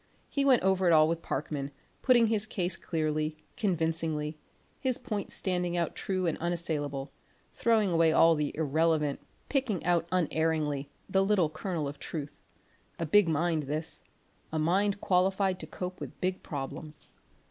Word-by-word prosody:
He 280 - 0
went 265 -6 +5
over 190 -1 +3
it 170 - +6
all 155 -1 +6
with 165 0 -1
Parkman, 140 -1 -3 0.3
putting 245 -3 +5
his 220 -1 0
case 180 -4 -1
clearly, 155 -2 -1 0.2
convincingly, 160 -5 -1 0.4
his 255 -2 0
points 210 -5 -4
standing 180 -2 0
out 170 -1 0
true 185 -1 -2
and 165 - -1
unassailable; 155 -5 -2 0.4
throwing 220 -5 +2
away 165 -1 +4
all 165 +1 +6
the 150 -2 -1
irrelevant, 155 -1 +1 0.3
picking 255 - 0
out 170 -1 +2
unerringly, 160 -5 0 0.2
the 190 0 +3
little 195 -6 +2
kernel 155 -1 -3
of 140 0 -7
truth; 145 -3 -6 0.6
a 165 - -2
big 190 +3 +5
mind 160 +1 +1
this, 155 +2 -4 0.5
a 160 - -2
mind 195 +6 +2
qualified 190 0 +2
to - - -7
cope 180 0 -6
with - - -8
big 185 0 -1
problems. 150 +2 -5
165 Hz, 150 wpm, -30 LUFS, 155-190 Hz, 0.6 s, it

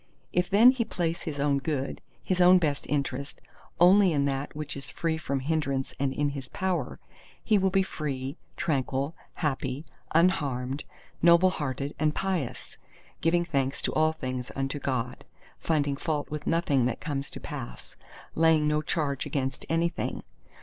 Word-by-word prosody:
If 180 0 +1
then 225 +6 +8
he 260 -3 0
place 170 -5 -2
his 150 -4 -5
own 140 -1 +2
good, 140 -1 -3 0.2
his 185 -1 +1
own 180 +1 +8
best 150 -5 -1
interest, 140 -1 -2 0.4
only 185 +2 +7
in 140 -2 +2
that 140 +1 -2
which 150 -1 -5
is 140 - -6
free 165 -2 -1
from 140 -4 -2
hindrance 140 -2 -1
and 140 -1 +1
in 145 +1 0
his 140 -2 -6
power, 190 -2 -2 0.5
he 215 -3 +3
will 190 0 +3
be 190 0 +3
free, 140 -6 -4 0.2
tranquil, 140 0 0 0.2
happy, 140 -2 -2 0.3
unharmed, 140 -6 +1 0.4
noble 170 +2 +6
hearted, 140 -3 -3
and 155 0 +1
pious; 185 -10 -3 0.4
giving 175 +1 +2
thanks 135 -4 0
to - - -1
all 155 0 +3
things 130 -5 -4
unto 135 +2 -2
God, 125 -3 -2 0.4
finding 145 -3 +1
fault 150 0 -2
with 150 -1 -5
nothing 145 -7 +2
that 120 - -3
comes 140 -3 -3
to - - -8
pass, 60 - -8 0.4
laying 160 -2 +4
no 150 0 +2
charge 145 -3 -1
against 135 -2 -3
anything. 165 +1 -1
150 Hz, 155 wpm, -28 LUFS, 135-165 Hz, 0.5 s, then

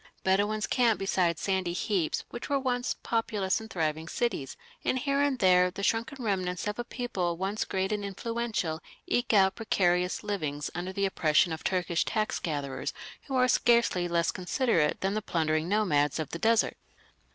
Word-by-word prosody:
Bedouins 205 +3 +2
camp 235 -4 +2
beside 180 -4 +1
sandy 190 -2 -1
heaps 180 -3 -1
which 240 - -6
were 285 - +2
once 245 -2 -1
populous 215 -4 0
and 220 - -10
thriving 160 -3 -2
cities, 185 - -2 0.3
and 260 - +1
here 275 +2 +1
and 285 -2 +1
there 180 -3 +5
the 200 +2 -7
shrunken 230 +5 -1
remnants 185 -3 -1
of 210 +2 -3
a - - -1
people 195 -9 -3
once 195 +4 -2
great 190 +1 -1
and 210 -1 -1
influential 200 -5 -2 0.2
eke 245 0 0
out 195 -2 +5
precarious 180 -5 +1
livings 155 -9 -3
under 180 +2 -4
the 200 +1 0
oppression 165 -2 +2
of 160 - -7
Turkish 180 -2 +1
tax 215 0 -1
gatherers 145 -4 -3 0.3
who 270 - -3
are 255 0 +4
scarcely 235 -8 +3
less 170 -1 +1
considerate 185 - +1
than 195 +1 0
the 215 - -1
plundering 160 -4 0
nomads 155 -9 +2
of 155 -2 -4
the 170 - -4
desert. 225 +2 +2
190 Hz, 170 wpm, -29 LUFS, 175-225 Hz, 0.3 s, there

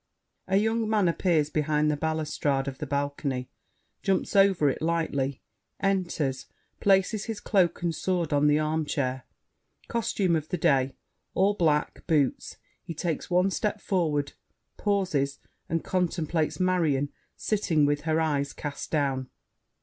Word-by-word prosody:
[A 190 - +3
young 220 +1 +1
man 210 -4 +3
appears 165 -3 +1
behind 150 0 +1
the - - 0
balustrade 150 -3 -1
of 135 -1 -5
the 150 - -4
balcony, 140 -2 -2 0.5
jumps 190 0 0
over 195 -6 +5
it 135 - 0
lightly, 155 -5 -1 0.4
enters, 175 -9 -1 0.3
places 195 +2 +2
his 225 -3 -4
cloak 180 -5 +1
and 170 -1 +1
sword 170 -1 -1
on 145 +1 +4
the 150 0 +4
armchair. 150 -4 -1 0.6
Costume 200 -6 +1
of 155 -1 -3
the 180 - -1
day: 135 -4 +2 0.4
all 195 +2 +3
black: 155 -6 0
boots. 150 -6 +1 0.2
He 165 - -7
takes 165 0 -3
one 180 +2 +3
step 210 +1 -1
forward, 155 -8 0 0.4
pauses 185 -10 0 0.3
and 165 0 -1
contemplates 170 -3 -1
Marion, 165 -7 +2 0.3
sitting 180 -8 +1
with 145 0 +1
her 160 0 +1
eyes 145 -3 0
cast 145 -2 -6
down. 135 -4 0
160 Hz, 135 wpm, -27 LUFS, 145-185 Hz, 0.6 s, over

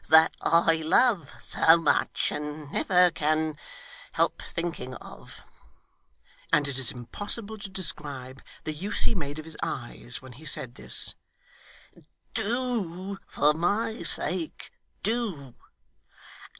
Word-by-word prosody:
' - - -24
That 160 +1 +8
I 165 -1 +4
love 175 - +3
so 160 +1 +6
much, 165 - +2
and 150 0 -5
never 180 -1 +5
can 155 0 +1 0.6
help - - +1
thinking 165 -7 -3
of,' - - -12 1.1
and 145 -1 +4
it 135 -2 -2
is 130 - +3
impossible 205 - -5
to 200 - -7
describe 145 -8 -3 0.2
the 155 - -2
use 190 +8 0
he - - +3
made 145 -7 -3
of 155 - -6
his 160 -2 -9
eyes 120 0 -4
when 130 -1 -12
he 140 +6 -14
said 125 -4 -4
this - - -1 1.2
'do 205 -5 -1
for 150 +1 +3
my 205 +7 0
sake, 170 0 -2 0.3
do. 195 - -1
160 Hz, 125 wpm, -28 LUFS, 145-195 Hz, 1.2 s, That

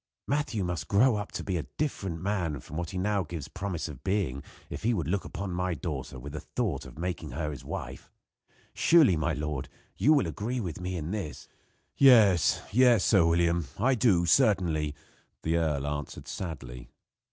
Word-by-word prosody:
Matthew 140 -7 -1
must 85 -4 -3
grow 115 +4 +4
up 105 +1 -5
to - - -4
be 95 -3 -1
a 80 - -4
different 95 - -2
man 90 -8 -1
from 75 - -10
what 85 -1 -3
he 90 - -5
now 100 +2 +1
gives 80 -4 -6
promise 90 -2 -4
of 75 -6 -10
being 95 -10 -1 0.3
if - - -7
he 115 +1 +1
would 85 -7 -2
look 95 +4 -1
upon 95 0 -5
my 90 0 -1
daughter 70 -6 -5
with 70 +3 -8
the 75 - -4
thought 80 - -3
of 65 - -13
making 85 -2 -4
her 75 -2 -2
his 70 - -8
wife. - - -6 0.6
Surely, 155 - +5
my 80 +1 0
lord, 75 -3 -3 0.3
you 125 +11 +4
will 145 - +3
agree 110 +10 -3
with 90 -6 -5
me, 90 0 -3
in 80 +1 -4
this?" 100 -8 -5 0.5
"Yes, 110 - +6
yes, 120 -2 +5
Sir 95 -6 +5
William, 85 -1 +2
I 125 +6 +3
do, 100 -8 +3
certainly," 85 - +2 0.5
the 80 +1 +1
earl 75 -4 0
answered 75 -1 -5
sadly. 65 -9 -6
90 Hz, 185 wpm, -29 LUFS, 75-105 Hz, 0.6 s, Yes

